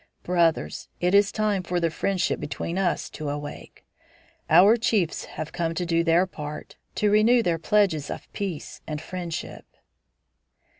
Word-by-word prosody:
Brothers, 170 Hz, -2 st, 0 dB
it 180 Hz, +1 st, +1 dB
is 200 Hz, 0 st, +5 dB
time 210 Hz, -3 st, 0 dB
for 180 Hz, 0 st, -2 dB
the 165 Hz, -1 st, 0 dB
friendship 185 Hz, 0 st, 0 dB
between 170 Hz, +4 st, -4 dB
us 185 Hz, -3 st, 0 dB
to 150 Hz, -2 st, -5 dB
awake. 145 Hz, 0 st, -7 dB, 0.6 s
Our 185 Hz, +8 st, +7 dB
chiefs 215 Hz, -7 st, 0 dB
have 155 Hz, -, -7 dB
come 165 Hz, -1 st, -2 dB
to 180 Hz, -, -1 dB
do 170 Hz, 0 st, +1 dB
their 170 Hz, +2 st, +4 dB
part, 150 Hz, -4 st, -8 dB, 0.2 s
to 210 Hz, -1 st, +2 dB
renew 230 Hz, +3 st, +5 dB
their 170 Hz, -4 st, 0 dB
pledges 195 Hz, -6 st, +2 dB
of -, -, -6 dB
peace 190 Hz, -7 st, -5 dB
and 150 Hz, -1 st, -3 dB
friendship." 175 Hz, -1 st, -6 dB
175 Hz, 150 wpm, -25 LUFS, 165-200 Hz, 0.6 s, Our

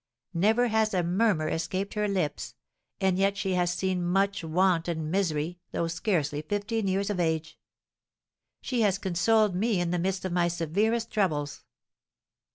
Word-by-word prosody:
Never 220 Hz, +8 st, +3 dB
has 220 Hz, -2 st, +1 dB
a 180 Hz, -, +2 dB
murmur 180 Hz, -2 st, +1 dB
escaped 175 Hz, +5 st, -2 dB
her 210 Hz, -1 st, 0 dB
lips; 150 Hz, -, -2 dB, 0.4 s
and 190 Hz, -2 st, +1 dB
yet 200 Hz, +1 st, +2 dB
she 190 Hz, -2 st, -1 dB
has 175 Hz, -1 st, +1 dB
seen 185 Hz, 0 st, -1 dB
much 195 Hz, +2 st, +1 dB
want 170 Hz, +1 st, +2 dB
and 160 Hz, -2 st, -3 dB
misery, 175 Hz, -3 st, -1 dB
though 170 Hz, -, 0 dB
scarcely 160 Hz, -4 st, -1 dB
fifteen 205 Hz, +5 st, -2 dB
years 195 Hz, +2 st, 0 dB
of 190 Hz, -, -3 dB
age! 160 Hz, -2 st, -1 dB, 1.0 s
She 250 Hz, -3 st, -1 dB
has 200 Hz, -3 st, +3 dB
consoled 195 Hz, +3 st, +2 dB
me 210 Hz, +1 st, +1 dB
in 175 Hz, -1 st, -1 dB
the 180 Hz, -, 0 dB
midst 190 Hz, +2 st, -1 dB
of 185 Hz, -, -2 dB
my 175 Hz, 0 st, +2 dB
severest 200 Hz, +8 st, 0 dB
troubles. 150 Hz, -9 st, -1 dB
185 Hz, 160 wpm, -28 LUFS, 165-200 Hz, 1.0 s, Never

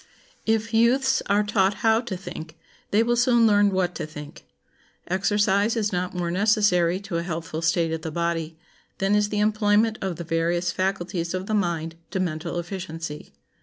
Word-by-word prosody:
If 225 Hz, +1 st, 0 dB
youths 250 Hz, +4 st, +3 dB
are 205 Hz, +1 st, +3 dB
taught 205 Hz, -1 st, +2 dB
how 225 Hz, 0 st, +4 dB
to 225 Hz, -7 st, -5 dB
think, 165 Hz, -3 st, -9 dB, 0.3 s
they 215 Hz, +3 st, +3 dB
will 240 Hz, +1 st, +1 dB
soon 240 Hz, -1 st, +4 dB
learn 205 Hz, -1 st, +5 dB
what 185 Hz, -2 st, 0 dB
to -, -, -5 dB
think. 150 Hz, -1 st, -10 dB, 0.6 s
Exercise 205 Hz, +3 st, +2 dB
is 210 Hz, -2 st, -1 dB
not 180 Hz, +1 st, -2 dB
more 175 Hz, -1 st, -1 dB
necessary 185 Hz, -3 st, +2 dB
to 195 Hz, -4 st, -4 dB
a -, -, -1 dB
healthful 165 Hz, -2 st, -4 dB
state 165 Hz, 0 st, +1 dB
of 160 Hz, -, -3 dB
the 160 Hz, -, -4 dB
body 165 Hz, -1 st, -2 dB, 0.4 s
than 195 Hz, +1 st, +1 dB
is 210 Hz, 0 st, +2 dB
the 210 Hz, -, -2 dB
employment 215 Hz, +1 st, +2 dB
of 190 Hz, -3 st, -2 dB
the 170 Hz, -, -6 dB
various 170 Hz, +1 st, 0 dB
faculties 185 Hz, -2 st, -2 dB
of 185 Hz, 0 st, -3 dB
the 215 Hz, -, -3 dB
mind 165 Hz, -5 st, -1 dB
to 190 Hz, -, -3 dB
mental 170 Hz, -2 st, -2 dB
efficiency. 165 Hz, -4 st, -6 dB
185 Hz, 175 wpm, -24 LUFS, 170-210 Hz, 0.6 s, learn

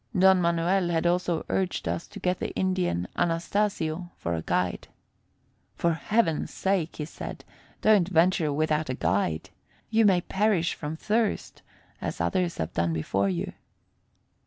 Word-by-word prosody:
Don 190 Hz, 0 st, +6 dB
Manuel 170 Hz, +2 st, +2 dB
had 165 Hz, 0 st, 0 dB
also 175 Hz, -1 st, +1 dB
urged 185 Hz, -2 st, -1 dB
us 165 Hz, -, -2 dB
to -, -, -10 dB
get 180 Hz, 0 st, 0 dB
the -, -, -2 dB
Indian 185 Hz, -, 0 dB
Anastasio 175 Hz, -1 st, 0 dB
for 85 Hz, -, -3 dB
a 80 Hz, -, -2 dB
guide. 90 Hz, +2 st, -1 dB, 0.9 s
"For 170 Hz, -1 st, +1 dB
heaven's 165 Hz, -1 st, 0 dB
sake," 190 Hz, -4 st, 0 dB
he 150 Hz, -, -4 dB
said, 160 Hz, -, -8 dB, 0.4 s
"don't 210 Hz, -5 st, +5 dB
venture 170 Hz, -3 st, +3 dB
without 155 Hz, 0 st, 0 dB
a 130 Hz, -, -1 dB
guide. 85 Hz, -1 st, 0 dB, 0.4 s
You 225 Hz, -1 st, +5 dB
may 185 Hz, -3 st, +4 dB
perish 190 Hz, -2 st, +1 dB
from 150 Hz, 0 st, -5 dB
thirst, 220 Hz, +3 st, -1 dB, 0.4 s
as -, -, -4 dB
others 170 Hz, -, 0 dB
have 80 Hz, +2 st, -3 dB
done 85 Hz, 0 st, +1 dB
before 95 Hz, +5 st, 0 dB
you." 85 Hz, -3 st, -3 dB
170 Hz, 145 wpm, -27 LUFS, 145-185 Hz, 0.9 s, Don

